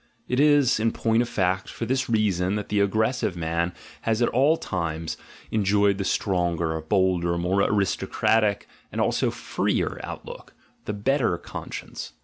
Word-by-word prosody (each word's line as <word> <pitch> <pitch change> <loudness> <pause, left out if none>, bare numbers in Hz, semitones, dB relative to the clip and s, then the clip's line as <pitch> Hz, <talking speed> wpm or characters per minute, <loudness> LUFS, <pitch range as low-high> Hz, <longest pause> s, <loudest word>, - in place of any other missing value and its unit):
It 125 - 0
is, 145 -5 +4
in 115 +1 +2
point 115 0 +2
of 120 - -2
fact, 95 -4 0
for 115 - -5
this 130 +2 0
reason 100 -4 +1
that 105 -1 -4
the 105 - +1
aggressive 110 0 +1
man 85 +1 -1 0.3
has 115 -1 0
at 120 - +3
all 140 +6 +3
times 85 - -3 0.4
enjoyed 100 -1 +2
the - - 0
stronger, 85 -5 0
bolder, 85 -1 +1
more 90 +3 +1
aristocratic, 105 +1 +1 0.2
and - - -4
also - - +2
jreer - - -1
outlook, - - -9 0.3
the 105 - -3
better 115 -2 +1
conscience. - - -7
100 Hz, 145 wpm, -25 LUFS, 90-115 Hz, 0.4 s, is